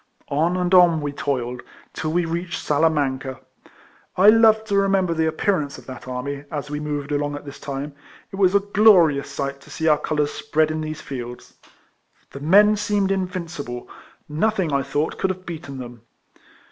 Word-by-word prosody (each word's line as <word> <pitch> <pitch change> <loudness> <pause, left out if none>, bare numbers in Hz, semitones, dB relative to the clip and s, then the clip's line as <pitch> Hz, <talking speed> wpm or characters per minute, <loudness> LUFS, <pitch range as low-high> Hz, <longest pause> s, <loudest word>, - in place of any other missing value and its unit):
On 165 +5 +1
and 180 0 -1
on 175 -3 +6
we 145 -1 -3
toiled, 125 -4 -3 0.3
till 155 - -3
we 175 +1 +1
reached 170 +2 -3
Salamanca. 140 -4 0 0.8
I 195 +3 +7
love 220 0 +5
to 210 -2 -2
remember 195 -3 +2
the 160 -1 +1
appearance 160 -2 -1
of - - -14
that 130 0 -10
army, 140 +3 -4
as 145 -1 -5
we 150 - -3
moved 150 -1 -4
along 145 0 -1
at 145 - -9
this 140 - -10
time. 140 +1 -5 0.4
It 195 - -7
was 190 -1 +3
a - - +7
glorious 190 -9 +4
sight 140 -1 -4
to - - -17
see 160 - -3
our 150 -1 +4
colours 150 -1 -1
spread 155 +1 0
in 155 0 -3
these 155 0 -5
fields. 125 -2 -8 0.8
The 140 - -8
men 205 +8 +5
seemed 205 -2 0
invincible; 170 -9 -4 0.4
nothing, 175 +1 0
I 140 - +2
thought, 145 +3 -2
could 190 - +1
have 185 0 -5
beaten 160 -5 -7
them. 120 -2 -9
155 Hz, 175 wpm, -22 LUFS, 140-185 Hz, 0.8 s, I